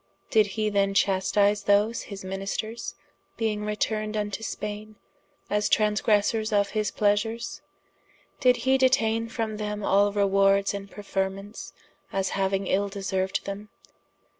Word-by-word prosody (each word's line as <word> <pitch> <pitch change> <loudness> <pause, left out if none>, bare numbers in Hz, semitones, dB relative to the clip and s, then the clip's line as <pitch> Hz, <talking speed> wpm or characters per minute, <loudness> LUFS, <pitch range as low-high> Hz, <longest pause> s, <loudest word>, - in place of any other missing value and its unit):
Did 215 -2 +5
he 215 -1 +1
then 195 -1 +1
chastise 200 +1 +2
those 205 +3 +3
his 195 -2 -7
ministers 195 +4 -4 0.4
being 215 -2 -1
returned 215 0 -1
into 210 0 -2
Spaine, 210 0 -5 0.5
as 210 0 0
transgressers 215 +1 +2
of 200 -1 +2
his 215 -1 0
pleasures? 210 +3 0 0.8
Did 250 -1 +4
hee 265 0 +4
detaine 230 -4 +2
from 225 -2 -3
them 210 -1 -4
all 200 +1 +3
rewards 195 0 +3
and 200 0 -6
preferments, 195 0 -4 0.4
as 195 -1 -1
hauing 195 0 0
ill 200 +2 +1
deserued 190 -1 -2
them? 200 +1 -6
205 Hz, 125 wpm, -26 LUFS, 195-215 Hz, 0.8 s, Did